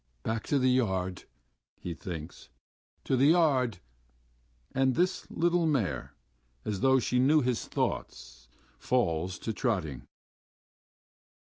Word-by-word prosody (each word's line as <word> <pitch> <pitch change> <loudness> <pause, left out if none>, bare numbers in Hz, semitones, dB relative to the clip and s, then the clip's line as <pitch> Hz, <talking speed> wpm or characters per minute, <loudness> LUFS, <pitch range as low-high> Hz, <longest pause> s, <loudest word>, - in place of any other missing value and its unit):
"Back 110 0 -3
to 145 - +2
the 130 -1 +3
yard!" 95 -7 0 0.5
he 90 - -5
thinks. 80 0 -8 0.5
"To 135 - +1
the 135 +2 +4
yard!" 140 - +3 1.0
And 130 -1 +2
his 185 +1 0
little 170 0 +1
mare, 105 - -1 0.5
as 105 -3 -2
though 130 +4 +4
she 125 0 +1
knew 150 +4 +5
his 125 -2 -1
thoughts, - - -4 0.3
falls 90 -8 0
to 110 - -4
trotting. 90 - -2
125 Hz, 115 wpm, -29 LUFS, 90-135 Hz, 1.0 s, knew